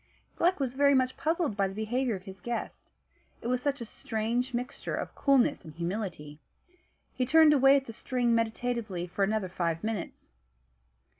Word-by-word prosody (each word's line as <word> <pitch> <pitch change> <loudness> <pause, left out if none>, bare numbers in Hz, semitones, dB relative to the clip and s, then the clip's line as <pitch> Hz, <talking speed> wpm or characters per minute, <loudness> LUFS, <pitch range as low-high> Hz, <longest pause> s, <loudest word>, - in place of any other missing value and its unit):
Gluck 355 0 +2
was 260 -3 -1
very 280 +1 +4
much 255 0 +2
puzzled 320 - 0
by 200 -1 +1
the 190 - -8
behaviour 235 +2 -1
of 185 - -8
his 190 -1 -11
guest, 240 0 -5 0.5
it - - -15
was 250 0 +1
such 280 -1 -1
a - - -4
strange 225 +4 -2
mixture 245 +1 -4
of - - -4
coolness 275 -3 +2
and 155 -2 -11
humility. 170 -5 -4 0.7
He 255 - -1
turned 310 +3 +6
away 270 -1 +6
at 270 - -3
the 230 - -8
string 245 +1 0
meditatively 230 -4 -1
for 180 +3 -2
another 210 -1 0
five 170 -2 -2
minutes. 215 - -5
235 Hz, 170 wpm, -29 LUFS, 195-260 Hz, 0.7 s, turned